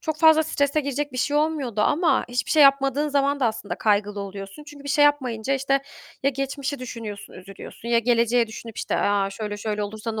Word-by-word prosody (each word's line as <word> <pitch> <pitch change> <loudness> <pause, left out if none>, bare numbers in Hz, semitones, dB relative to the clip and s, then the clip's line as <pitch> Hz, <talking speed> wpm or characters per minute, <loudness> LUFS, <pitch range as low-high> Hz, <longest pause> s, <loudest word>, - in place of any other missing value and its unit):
çok 315 -1 -3
fazla 315 0 +6
strese 300 -1 0
girecek 285 0 -3
bir 255 - -5
şey 290 +3 0
olmuyordu 295 -8 0
ama 295 +4 +2
hiçbir 245 +1 -2
şey 310 -2 +6
yapmadığın 275 +1 +4
zaman 280 0 +1
da 245 - +3
aslında 220 -2 -3
kaygılı 205 -1 0
oluyorsun. 195 +7 -8
Çünkü 290 -1 -13
bir - - -6
şey 290 +1 +4
yapmayınca, 265 -3 +1
işte, 275 +1 +1 0.4
ya 275 - +3
geçmişi 275 +1 -4
düşünüyorsun, 225 -5 -7
üzülüyorsun 195 +4 -11
ya 235 -1 +4
geleceği 235 0 +2
düşünüp, 220 0 -10
işte, - - -2
"A, 200 -1 +1
şöyle 210 +1 -5
şöyle 210 0 -3
olursa 215 +2 -5
ne 220 - -4
255 Hz, 200 wpm, -24 LUFS, 215-285 Hz, 0.4 s, fazla